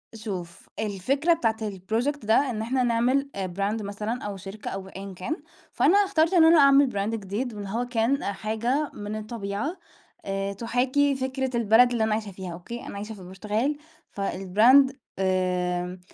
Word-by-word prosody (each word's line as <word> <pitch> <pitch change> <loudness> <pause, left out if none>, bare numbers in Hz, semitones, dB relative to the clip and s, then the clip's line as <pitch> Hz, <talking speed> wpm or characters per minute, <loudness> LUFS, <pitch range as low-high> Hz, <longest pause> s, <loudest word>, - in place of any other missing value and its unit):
شوف، 185 -6 -7
الفكرة 255 - +1
بتاعة 225 -9 +1
الproject 220 +8 -2
ده 220 - +3 0.2
إن 220 -3 -3
إحنا 255 +3 0
نعمل 245 +4 +2
آآ، 195 -1 -2
brand 200 +5 -2
مثلًا 210 +4 -4
أو 205 -1 -4
شركة 195 +3 -7
أو 190 0 -6
أيًا 195 0 -8
كان، 185 - -3 0.4
فأنا 390 - +4
اخترت 380 -4 +3
إن 335 -3 +7
أنا 325 0 +7
أعمل 275 -1 +6
brand 205 +3 -1
جديد، 215 +4 -4
واللي 200 -2 -6
هو 235 +4 -1
كان 245 +3 0
آآ، - - -1
حاجة 230 +8 -1
من 210 +1 -5
الطبيعة 215 - -4 0.5
آآ، 195 0 -2
تُحاكي 255 +6 +1
فكرة 260 -1 -2
البلد 235 +2 +5
اللي 235 -2 +1
أنا 220 -1 +1
عايشها 215 -2 -3
فيها، 185 -2 -7
أوكي؟ 235 +8 -8
أنا - - -7
عايشة 210 +2 -6
في 195 - -13
البرتغال 210 +9 -2 0.4
فالbrand 215 +8 +4 0.3
آمم، 180 -1 0
220 Hz, 165 wpm, -26 LUFS, 195-260 Hz, 0.5 s, إن